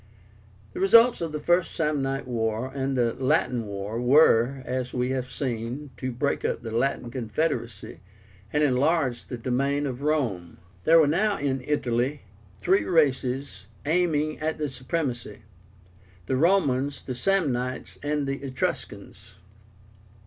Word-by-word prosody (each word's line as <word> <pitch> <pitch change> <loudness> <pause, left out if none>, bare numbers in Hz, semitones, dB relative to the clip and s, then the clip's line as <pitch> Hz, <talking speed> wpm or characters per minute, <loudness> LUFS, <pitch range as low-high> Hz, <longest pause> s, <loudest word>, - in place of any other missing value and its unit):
The - - -6
results 230 +4 +6
of 165 -2 -2
the 150 - -3
First 175 +3 +1
Samnite 140 -4 -1
War 115 +1 -2
and 135 -1 -2
the 120 -2 +2
Latin 125 -3 0
War 100 +3 -4
were, 130 -1 +4
as 125 0 -3
we 125 +1 0
have 130 -1 -2
seen, 130 +2 -4
to 130 0 -3
break 135 +4 -1
up - - -2
the 115 - -5
Latin 120 0 -1
confederacy, 120 - -3 0.5
and 150 0 +2
enlarge 140 -1 +1
the 125 - -5
domain 140 +4 0
of 130 -1 -4
Rome. 125 - -1 0.3
There 165 +1 +7
were 160 - +6
now 195 +8 +1
in 135 -2 -2
Italy 135 -1 -1 0.4
three 190 +2 +3
races 130 - 0 0.2
aiming 155 -2 +1
at 155 +1 -2
the 150 -2 -2
supremacy, 125 -4 -4 0.8
the 130 - -1
Romans, 145 -4 +2
the 130 - -4
Samnites, 130 -5 -1
and 145 0 -1
the 135 0 -3
Etruscans. 135 -2 -5
135 Hz, 135 wpm, -26 LUFS, 125-150 Hz, 0.8 s, There